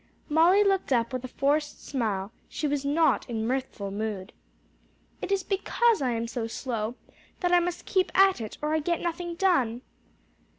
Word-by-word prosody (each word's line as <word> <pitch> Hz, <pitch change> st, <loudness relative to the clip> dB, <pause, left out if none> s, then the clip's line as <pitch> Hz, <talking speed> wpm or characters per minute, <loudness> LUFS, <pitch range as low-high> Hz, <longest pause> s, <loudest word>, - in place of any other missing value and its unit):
Molly 340 Hz, +7 st, +5 dB
looked 390 Hz, -6 st, +1 dB
up 235 Hz, -1 st, +2 dB
with 255 Hz, -1 st, -3 dB
a -, -, -4 dB
forced 295 Hz, +3 st, -1 dB
smile: 210 Hz, -6 st, -2 dB, 0.2 s
she 305 Hz, -, -2 dB
was 285 Hz, -1 st, -1 dB
not 295 Hz, 0 st, +2 dB
in 220 Hz, -2 st, -2 dB
mirthful 250 Hz, -5 st, -3 dB
mood. 205 Hz, -1 st, -4 dB, 0.9 s
"It -, -, -4 dB
is 390 Hz, -1 st, +1 dB
because 430 Hz, +2 st, +1 dB
I 260 Hz, -, +1 dB
am 230 Hz, -1 st, -1 dB
so 230 Hz, -1 st, -3 dB
slow 230 Hz, -1 st, -3 dB, 0.5 s
that 355 Hz, -1 st, +1 dB
I 355 Hz, -, +6 dB
must 350 Hz, 0 st, -3 dB
keep 375 Hz, -2 st, +1 dB
at 385 Hz, -7 st, +5 dB
it 215 Hz, -, -6 dB
or 305 Hz, +1 st, 0 dB
I 315 Hz, -, +2 dB
get 340 Hz, +3 st, 0 dB
nothing 345 Hz, 0 st, -3 dB
done." 265 Hz, -11 st, +1 dB
285 Hz, 175 wpm, -27 LUFS, 230-355 Hz, 0.9 s, I